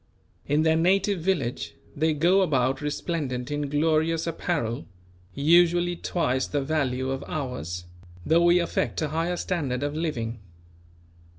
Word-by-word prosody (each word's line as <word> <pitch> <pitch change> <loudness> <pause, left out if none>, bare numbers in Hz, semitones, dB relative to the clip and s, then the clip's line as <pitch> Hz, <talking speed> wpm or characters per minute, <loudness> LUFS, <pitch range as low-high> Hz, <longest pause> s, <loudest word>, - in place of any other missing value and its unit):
In 150 +2 +2
their 160 0 +3
native 195 +3 +2
village 160 -9 -1 0.2
they 155 +1 +1
go 175 +6 +4
about 135 -6 +1
resplendent 145 -4 -3
in 145 -1 -2
glorious 160 +2 +1
apparel, 150 -7 -2 0.5
usually 175 +4 +4
twice 130 -7 -1
the 145 -2 -1
value 135 -3 -1
of 135 0 -3
ours; 125 - -4 0.4
though 165 +2 +4
we 175 +1 +5
affect 170 -1 -1
a 155 - -1
higher 165 +3 -1
standard 140 -9 -2
of 145 0 -1
living. 120 -8 -3
155 Hz, 130 wpm, -26 LUFS, 135-170 Hz, 0.5 s, we